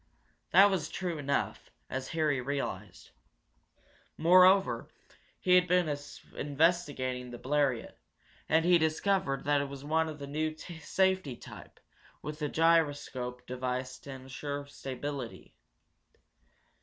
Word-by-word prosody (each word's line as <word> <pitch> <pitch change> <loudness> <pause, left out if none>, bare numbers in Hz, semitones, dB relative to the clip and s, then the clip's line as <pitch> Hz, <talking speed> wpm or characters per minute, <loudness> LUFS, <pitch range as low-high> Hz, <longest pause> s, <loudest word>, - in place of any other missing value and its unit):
That 200 +1 +7
was 175 -6 -1
true 175 -4 -3
enough, 140 -1 -2 0.2
as 130 0 -4
Harry 155 -5 0
realized. 140 +2 -5 1.1
Moreover, 180 -7 +5 0.5
he 180 - +2
had 180 0 +6
been 175 -4 +2 0.4
investigating 140 -5 0
the 120 - -7
Bleriot, 135 -2 -1 0.5
and 160 +1 +3
he 175 -1 +6
discovered 160 -2 +1
that 145 0 +2
it 140 - -4
was 140 0 -8
one 160 +1 +1
of 155 - -7
the 140 - -7
new 155 +2 -2
safety 180 -2 -1
type, - - -12 0.4
with 150 +1 -6
a 150 - 0
gyroscope 145 -7 +1
device 125 0 -3
to - - -13
insure 135 +2 -6
stability. 135 -2 -6
145 Hz, 120 wpm, -31 LUFS, 130-165 Hz, 1.1 s, That